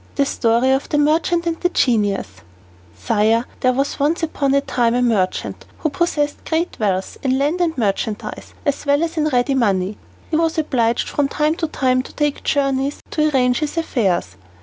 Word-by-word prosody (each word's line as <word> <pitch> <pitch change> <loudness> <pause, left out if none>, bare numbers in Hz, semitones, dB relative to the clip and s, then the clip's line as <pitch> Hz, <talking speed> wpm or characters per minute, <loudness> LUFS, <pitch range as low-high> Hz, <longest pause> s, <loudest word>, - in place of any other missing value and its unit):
The 280 - +2
Story 240 0 +2
of 270 +1 0
the 295 - +1
Merchant 325 +3 +2
and 330 -1 -2
the 355 - +2
Genius 215 - +1 0.7
Sire, 225 +2 +2
there 255 - +3
was 275 +4 -1
once 310 +4 +1
upon 280 -4 0
a 280 - +4
time 240 -3 +1
a 250 - +2
merchant 205 -6 0
who 310 - -1
possessed 295 -2 -1
great 330 +2 -1
wealth, 195 -3 -1
in 260 -1 +1
land 295 +6 0
and 325 -3 0
merchandise, 210 -1 -3
as 285 -1 0
well 285 +3 +3
as 335 0 -2
in 305 -1 +2
ready 255 -1 +1
money. 200 -5 0 0.3
He 310 - +2
was 325 0 +1
obliged 240 -7 +1
from 290 -1 0
time 300 +2 +1
to 325 - -1
time 255 -4 +1
to - - -12
take 295 -1 -1
journeys 275 0 0
to 305 -1 +2
arrange 250 -3 +2
his 305 +2 -3
affairs. 190 - 0
275 Hz, 185 wpm, -20 LUFS, 235-305 Hz, 0.7 s, a